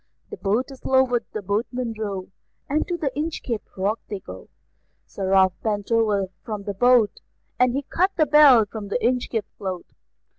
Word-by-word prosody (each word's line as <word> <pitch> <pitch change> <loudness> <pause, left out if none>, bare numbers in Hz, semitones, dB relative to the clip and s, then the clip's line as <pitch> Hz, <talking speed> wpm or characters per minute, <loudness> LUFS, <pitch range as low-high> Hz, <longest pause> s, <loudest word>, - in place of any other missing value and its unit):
The 430 - -6
boat 225 +7 -1
is 265 - -13
lowered, 260 -3 +2
the 215 - -5
boatmen 230 +4 -2
row, 200 -3 -5 0.4
And 300 +2 0
to 350 - -2
the 295 -5 -1
Inchcape 295 -7 -3 0.2
Rock 200 +4 0
they 205 -2 -4
go; 95 - -11 0.6
Sir 190 -1 -4
Ralph 190 -1 +5
bent 205 -1 -2
over 210 -4 +2
from 210 -4 -5
the 205 0 -4
boat, 240 0 +3 0.4
And 250 -1 +4
he 280 - -1
cut 365 +7 +1
the 310 - +4
bell 290 -7 +7
from 210 0 -7
the 200 - 0
Inchcape 240 -3 0
float. 190 -3 -4
225 Hz, 175 wpm, -23 LUFS, 200-260 Hz, 0.6 s, bell